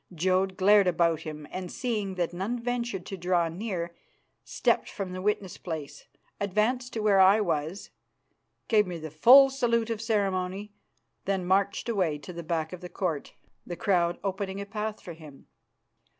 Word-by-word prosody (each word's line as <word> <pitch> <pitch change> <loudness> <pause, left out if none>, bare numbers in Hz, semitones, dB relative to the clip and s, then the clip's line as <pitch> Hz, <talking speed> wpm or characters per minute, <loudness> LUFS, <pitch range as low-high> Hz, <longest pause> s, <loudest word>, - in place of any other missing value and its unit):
Jodd 185 +2 +1
glared 200 0 +5
about 170 -2 +2
him, 155 -2 -8
and, 185 -1 -5
seeing 210 -6 -2
that 175 -1 -1
none 195 +7 -2
ventured 235 -5 -3
to 195 - -6
draw 175 -1 +1
near, 175 -2 -4 0.5
stepped - - 0
from 195 -3 -5
the 185 0 -5
witness 200 -2 -1
place, 150 -4 -7 0.3
advanced 220 +6 0
to 225 - -2
where 205 -2 +4
I 190 +3 +7
was, 165 -1 -2 0.8
gave 210 -3 +3
me 175 -1 -5
the 155 -1 -7
full 265 - +8
salute 235 -3 0
of 220 -1 -3
ceremony, 200 -2 -1 0.5
then 190 -2 -1
marched 195 +4 +1
away 185 -10 0
to 180 +5 -10
the 170 - -6
back 160 0 -2
of 180 - -8
the 180 - -8
Court, 165 -7 -3 0.3
the 175 - -6
crowd 175 -3 +1
opening 195 0 -3
a 200 - -4
path 215 +1 -4
for 175 - -8
him. 155 -4 -14
190 Hz, 165 wpm, -28 LUFS, 170-210 Hz, 0.8 s, full